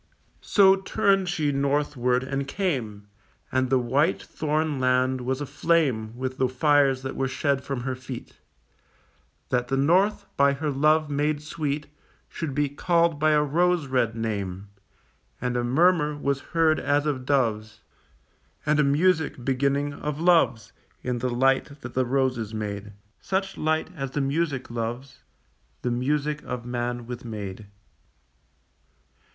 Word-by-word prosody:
So 195 -2 +5
turned 195 -1 +1
she 155 -4 0
northward 140 -3 +1
and 135 +1 -3
came, 130 - -2 0.5
And 130 -1 +1
the 130 - +4
white 135 +8 +1
thorn 155 -1 -2
land 130 0 +2
was 130 +3 -2
aflame 140 -6 0
With 130 0 -4
the 130 - +3
fires 135 0 +3
that 130 - -4
were 135 - 0
shed 140 +1 0
from 135 -3 -4
her 130 +1 -2
feet, 130 -1 -9 1.1
That 125 -1 0
the 135 - 0
north, 180 +9 +3
by 140 0 +4
her 150 +2 -2
love 155 +2 +2
made 145 +1 0
sweet, 150 -1 -3 0.4
Should 150 -5 -5
be 145 0 +2
called 170 +2 +1
by 155 0 +3
a 150 0 +4
rose 170 +2 +2
red 125 -4 0
name; 100 -4 -4 0.7
And 125 0 -2
a 120 - 0
murmur 150 +3 +3
was 140 -1 -1 0.2
heard 160 -1 +4
as 145 +1 +1
of 140 -4 -1
doves, 110 -5 0 0.8
And 150 0 +2
a - - +5
music 150 -2 +1
beginning 140 +2 0
of 150 +1 -4
loves 165 -9 +3 0.3
In 125 -1 -2
the 125 +2 -1
light 135 +3 +1
that - - -8
the 130 0 +1
roses 125 -4 0
made, 105 -1 -5 0.3
Such 195 0 -2
light 160 +2 -1
as 135 -4 -4
the 145 +2 -2
music 140 -2 -1
loves, 120 +3 -5 0.6
The 125 - 0
music 150 +4 -1
of 125 -1 -6
man 120 0 -3
with 125 +1 -7
maid. 105 -3 -7
140 Hz, 145 wpm, -25 LUFS, 125-150 Hz, 1.1 s, So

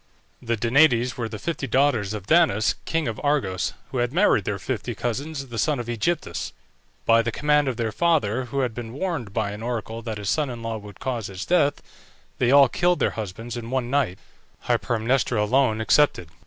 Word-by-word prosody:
The 115 -1 -1
DANAÏDES 120 +1 +3
were 120 -4 -3
the 110 - -6
fifty 140 +5 -3
daughters 120 -5 +2
of 100 -3 -7
Danaus, 135 - +3
king 165 -3 -1
of 115 -1 -4
Argos, 110 -11 0 0.2
who 130 - -2
had 120 0 0
married 165 - +3
their 100 - -1
fifty 120 +2 -4
cousins, 135 +7 -3
the 115 -1 -4
sons 145 +4 +1
of - - -7
Ægyptus. 120 - -2 0.5
By 115 0 +5
the 120 - -2
command 150 +3 +2
of 125 -3 -2
their 115 -2 -1
father, 130 -7 +1
who 135 +3 -2
had 125 -3 -1
been 115 0 -7
warned 145 - -3
by 105 -1 -1
an 105 +1 -7
oracle 115 -1 -4
that 110 -2 -5
his 105 -1 -6
son 150 +5 +1
in 120 -2 -7
law 115 -1 -3
would 105 -1 -12
cause 120 -5 -3
his 95 0 -6
death, 150 -5 +2 0.6
they 120 - +3
all 140 0 +7
killed 175 +7 +1
their - - +1
husbands 110 +3 -6
in 115 -1 -6
one 125 -1 -1
night, 135 -10 +1 0.5
Hypermnestra 120 0 +1
alone 110 +1 +2
excepted. 110 - +3
120 Hz, 195 wpm, -24 LUFS, 110-140 Hz, 0.6 s, all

